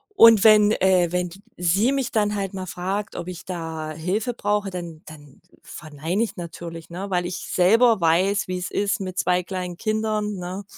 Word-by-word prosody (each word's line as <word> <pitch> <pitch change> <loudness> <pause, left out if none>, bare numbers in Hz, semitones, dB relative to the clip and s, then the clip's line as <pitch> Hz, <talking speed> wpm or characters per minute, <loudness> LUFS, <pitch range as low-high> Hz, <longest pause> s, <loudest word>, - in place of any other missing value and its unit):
und 230 - +8
wenn, 210 -1 +6
äh 185 -4 +2
wenn 180 0 -1
die 190 +4 -14 0.2
sie 185 +8 +2
mich 270 -3 -1
dann 210 -1 +1
halt 195 -1 -3
mal 185 -1 -5
fragt, 190 +4 -4
ob 175 - -6
ich 180 -1 -7
da 160 -3 -5
Hilfe 185 +10 -2
brauche, 205 -2 -1
dann 170 -4 -7
dann 145 -3 -14 0.2
verneine 155 +6 -4
ich 225 - -5
natürlich, 170 -1 -8
ne, 190 +4 -5
weil 180 -2 0
ich 180 +1 -4
selber 225 +5 +4
weiß, 180 +5 +2
wie's 180 -1 -3
ist 205 +4 0
mit 185 -1 -6
2 180 0 +2
kleinen 180 -1 -5
Kindern, 215 0 -1
ne? 185 +2 -6
185 Hz, 185 wpm, -23 LUFS, 175-210 Hz, 0.2 s, und